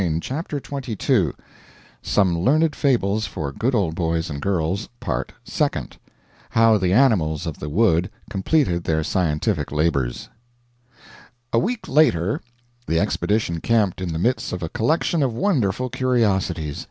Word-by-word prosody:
END 85 -1 -1
OF 155 +6 -3 0.2
PART 140 -2 -6
FIRST 100 - +2 0.7
SOME 95 -4 +2
LEARNED 150 - +2
FABLES 110 -6 +1
FOR 75 -6 -4
GOOD 120 - -1
OLD 95 -8 +1
BOYS 80 -1 -1
AND 70 0 -5
GIRLS 95 +2 -1
PART - - -3
SECOND - - -2 0.5
HOW 115 -1 +4
THE 90 -2 +1
ANIMALS 95 - +3
OF 80 -3 -5
THE 75 - -5
WOOD 90 0 +2 0.2
COMPLETED 95 - +1
THEIR 80 -1 +1
SCIENTIFIC 75 -2 0
LABORS 75 -5 -1 1.2
A 115 - +4
week 230 - -2
later 105 - +2 0.5
the 80 - +2
expedition 100 -3 0
camped 105 -6 +1
in 90 -2 -2
the 80 - -2
midst 120 +9 0
of 90 - -4
a 80 - -3
collection 160 - +1
of 130 -5 0
wonderful 130 - 0
curiosities. 100 - 0
95 Hz, 140 wpm, -22 LUFS, 80-125 Hz, 1.2 s, HOW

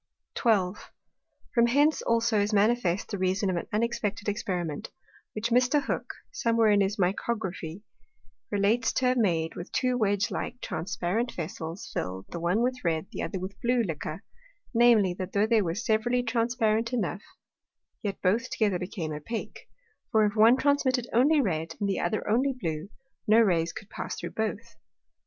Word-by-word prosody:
12. 205 -4 0 0.6
From 235 0 +4
hence 290 +5 +3
also 230 -1 +2
is 205 +1 +1
manifest 205 -3 +2
the 200 - -4
reason 190 +1 +1
of - - -1
an 170 - -3
unexpected 215 -1 -1
Experiment, 185 -5 -3 0.5
which 220 +2 -2
Mr. 250 +4 +4
Hook, - - -3 0.2
somewhere 230 - +2
in 205 -1 +4
his 195 +1 0
Micrography, 190 -2 -2 0.7
relates 205 +4 +2
to 260 - 0
have 250 0 +3
made 165 -7 +1
with 175 - -7
two 255 -1 +1
wedge 205 0 +1
like 245 +6 -4
transparent 180 +7 -2
Vessels 165 +1 -6
fill'd, 95 +1 -4
the 170 - -4
one 180 +7 +1
with 255 +1 0
a - - -14
red, 160 -2 0
the - - -5
other 195 - -3
with 185 +1 -5
a 200 - -30
blue 240 0 +2
Liquor; 160 0 -5 0.5
namely, 230 -6 +5
that 185 0 -6
though 205 +1 +3
they 220 -1 +3
were 170 -3 -2
severally 240 +3 +1
transparent 230 -1 +1
enough, 205 -4 -1 0.8
yet 200 -3 -3
both 225 +7 +2
together 205 -5 +1
became 180 -3 -4
opake: 155 +10 -6 0.4
For, 220 -1 +4
if 205 0 -1
one 225 +3 +6
transmitted 265 -3 +1
only 285 +6 +4
red, 165 -6 -2
and 205 - 0
the 195 - 0
other 175 +5 -1
only 255 +6 +2
blue, 160 -2 -3 0.4
no 215 +2 +6
Rays 170 -7 +3
could 210 +3 -10
pass - - -5
through - - -6
both. 220 +1 -4
210 Hz, 170 wpm, -28 LUFS, 185-235 Hz, 0.8 s, one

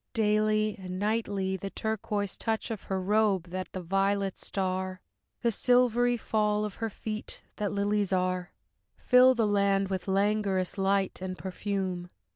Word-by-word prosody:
Daily 215 -1 +2
and 185 -1 -6
nightly 200 -2 0
The 195 +1 -5
turquoise 210 -1 -2
touch 225 0 -2
of 220 - -5
her 190 -1 -1
robe, 195 -2 +1
that 185 0 -4
the 185 - -5
violets 195 +2 0
star, 185 -1 -2 0.4
The 235 - +3
silvery 245 +1 +3
fall 210 -2 +1
of 210 - -5
her 225 - 0
feet, 215 +1 -6
that 205 -1 -1
lilies 205 -1 0
are, 185 -1 0 0.5
Fill 255 +1 +6
the 230 -2 +2
land 200 -1 +2
with 190 -1 -3
languorous 195 -1 +1
light 195 -1 +1
and 185 -1 -4
perfume. 190 -2 -3
200 Hz, 145 wpm, -29 LUFS, 190-215 Hz, 0.5 s, Fill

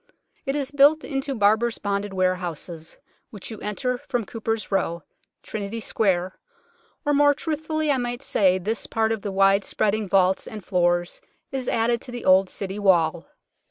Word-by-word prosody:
It 270 - 0
is 280 -2 -2
built 290 +2 +5
into 270 -1 -3
Barbers' 220 +2 +2
Bonded 200 0 -2
Warehouses, 180 -3 -3 0.3
which 210 +1 -8
you 220 - -7
enter 250 +4 -2
from 240 -3 -1
Cooper's 225 -1 -3
Row, 170 -4 -1 0.4
Trinity 215 +1 -5
Square 190 -4 0 0.7
or 290 - +2
more 290 0 +5
truthfully 310 0 -1
I 275 - +2
might 245 +1 -3
say 185 -7 +3
this 210 +5 -3
part 225 0 0
of 220 -2 -2
the 200 - -4
wide 195 +1 +4
spreading 210 0 0
vaults 190 0 +2
and 210 -3 -8
floors 175 -1 0 0.3
is 260 -2 -3
added 235 +1 +1
to 250 - -10
the 245 -1 -6
old 185 0 +5
City 195 0 -5
Wall. 170 -4 +2
210 Hz, 160 wpm, -24 LUFS, 190-245 Hz, 0.7 s, built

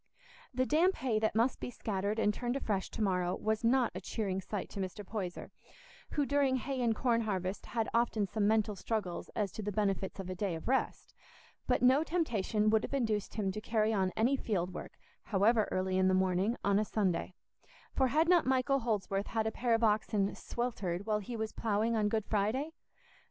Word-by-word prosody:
The 255 -1 0
damp 335 +7 +3
hay 240 -5 0
that 220 0 0
must 235 +4 +2
be - - -4
scattered 205 -3 -2
and 210 -2 +2
turned 245 +3 -2
afresh 205 -8 -1
to 220 - -3
morrow 180 -2 +1
was 220 +1 -1
not 245 +1 +3
a 185 - -6
cheering 195 -1 -2
sight 200 +1 -4
to - - -6
Mr. 195 +2 -4
Poyser, 185 -4 -5 0.6
who 290 - +1
during 275 -1 +2
hay 260 +1 -2
and 230 -2 +2
corn 235 -1 +2
harvest 190 -3 -3
had 225 -2 -1
often 230 -3 +2
some 205 +1 0
mental 215 -1 +2
struggles 195 -3 -3
as 205 -3 -1
to - - -6
the 210 0 -3
benefits 195 -1 -1
of 190 - -5
a 185 - -3
day 185 -1 -2
of 160 - -8
rest; 265 +2 -1 0.5
but - - +2
no 260 +4 +5
temptation 220 - 0
would 220 -1 +4
have - - -3
induced 220 -6 -1
him 200 -3 0
to 215 - -5
carry 220 0 +1
on 190 -3 +1
any 245 +5 +3
field 185 -8 -2
work, - - -8 0.3
however 215 +2 +3
early 185 0 0
in 185 - +4
the 185 - +3
morning, 190 +4 +1
on 200 0 +3
a - - +2
Sunday; 190 -4 -1 0.6
for 265 - +3
had 310 +6 +2
not 350 -5 +4
Michael 265 +1 +2
Holdsworth 205 -4 -1
had 220 -1 -1
a 220 - 0
pair 235 0 +1
of 225 - -1
oxen 210 -2 +2
"sweltered" 205 -7 -3
while 215 -1 +1
he 230 +3 -6
was 220 0 -3
ploughing 220 +1 0
on 210 -1 +2
Good 220 -1 -1
Friday? 220 +9 0
215 Hz, 205 wpm, -32 LUFS, 195-240 Hz, 0.6 s, no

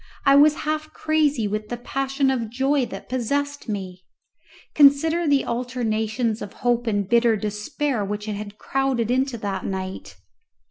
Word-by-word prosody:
I 275 - +6
was 295 +1 +6
half 310 0 -2
crazy 295 -7 +1
with 210 +1 -4
the 240 - -3
passion 270 +2 0
of 235 -4 -2
joy 265 +2 +1
that 195 -1 -9
possessed 285 +2 -2
me. 185 -3 -5 0.7
Consider 310 +4 +4
the 285 -2 +3
alternations 235 -2 -1
of 205 - -7
hope 240 0 +2
and 205 -3 0
bitter 235 0 +4
despair 210 +4 -2
which 205 +1 -4
had 210 -2 -3
been 205 - -19
crowded 265 -4 -1
into 260 -1 0
that 200 -3 -3
night! 190 -1 -5
240 Hz, 150 wpm, -23 LUFS, 210-275 Hz, 0.7 s, I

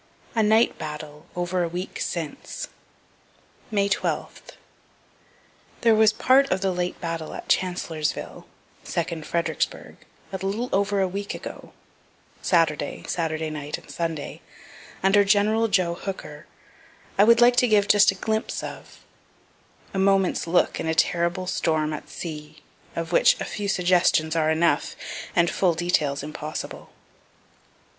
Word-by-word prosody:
A 225 - +3
NIGHT 220 +2 +3
BATTLE 150 -1 -7
OVER 175 +1 -1
A 170 - +1
WEEK 180 +3 -5
SINCE 165 -4 -4 1.0
May 200 -3 +1
12. 200 - -2 1.4
There 230 -1 +5
was 220 0 +5
part 265 +5 +4
of 185 - 0
the 195 -1 +1
late 180 0 -2
battle 165 -2 -4
at - - -8
Chancellorsville, 175 -4 -1 0.4
(second 165 -2 -3
Fredericksburgh,) 170 0 -2 0.4
a - - -1
little 200 +6 -2
over 200 0 +2
a 190 - +2
week 200 +2 -4
ago, - - -9 0.7
Saturday, 155 -4 +1
Saturday 160 -2 -2
night 150 -1 -4
and - - -14
Sunday, 165 -3 -4 0.6
under 200 +1 +5
Gen. 215 +3 +3
Joe 180 -4 +2
Hooker, 170 -4 -7 0.7
I - - +9
would 230 +2 +6
like 240 0 +6
to 250 - +5
give 210 -2 +3
just 205 -1 +6
a 195 - +1
glimpse 220 +3 -2
of - - -9 0.9
(a 195 - -1
moment's 195 -2 +2
look 175 +2 +2
in - - -3
a 160 - 0
terrible 170 +2 +1
storm 155 -4 0
at - - -7
sea 150 -2 -8 0.3
of 165 0 -3
which - - +5
a - - -3
few 205 -1 -4
suggestions 175 -4 +2
are 155 -1 +2
enough, 160 +2 +1 0.4
and 170 -1 +4
full 180 -4 +2
details 155 -5 0
impossible.) 155 +1 -6
180 Hz, 135 wpm, -25 LUFS, 160-200 Hz, 1.4 s, I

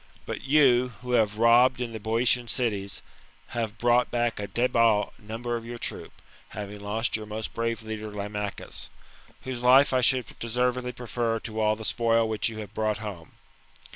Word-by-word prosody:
But - - -5
you, 130 -3 +4
who 125 - -5
have 110 -3 +2
robbed 120 +3 +5
in 120 -2 -3
the 110 - -5
Boeotian 115 +3 +2
cities, 105 -6 -1 0.5
have 115 -3 -3
brought 120 +1 +3
back 120 -2 0
a 100 - -3
debile 115 -1 +2
number 115 +2 -4
of 115 - -4
your 120 +1 -7
troop, - - -5 0.3
having 105 0 -7
lost 105 +3 -1
your 110 -1 -4
most 110 +1 -5
brave 115 0 -2
leader 110 -1 -5
Lamachus, 105 0 -4 0.5
whose 130 -2 -5
life 130 +3 +6
I 130 - +3
should 125 0 +3
deservedly 125 +2 -1
prefer 120 -1 -2
to 110 -1 -4
all 110 0 +3
the 110 0 -7
spoil 115 0 +2
which 110 +1 0
you 110 - -8
have 105 -2 -8
brought 110 -1 0
home. 100 -6 -8
115 Hz, 170 wpm, -27 LUFS, 110-120 Hz, 0.5 s, life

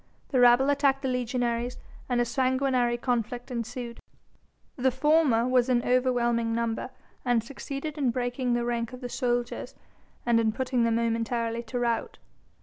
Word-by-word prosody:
The 260 - +1
rabble 245 +3 +6
attacked 275 -1 +2
the - - 0
legionaries 245 -1 -1 0.3
and 245 -1 +1
a 240 - +3
sanguinary 255 -1 +1
conflict 245 +1 -2
ensued. 235 0 -5 0.8
The 260 0 +2
former 260 -3 +3
was 255 0 +3
in 240 -1 +2
overwhelming 240 -2 +1
number 230 +1 -2 0.3
and 245 -3 +2
succeeded 280 +4 -6
in 270 -3 +2
breaking 245 +1 -1
the 240 0 0
rank 235 0 -2
of 250 - -9
the 245 - -5
soldiers, 245 -1 -2 0.5
and 235 -1 +4
in 220 -1 +1
putting 250 -1 0
them 230 -1 +2
momentarily 230 0 -1
to 235 +2 -5
rout. 235 -1 -1
245 Hz, 150 wpm, -27 LUFS, 235-255 Hz, 0.8 s, rabble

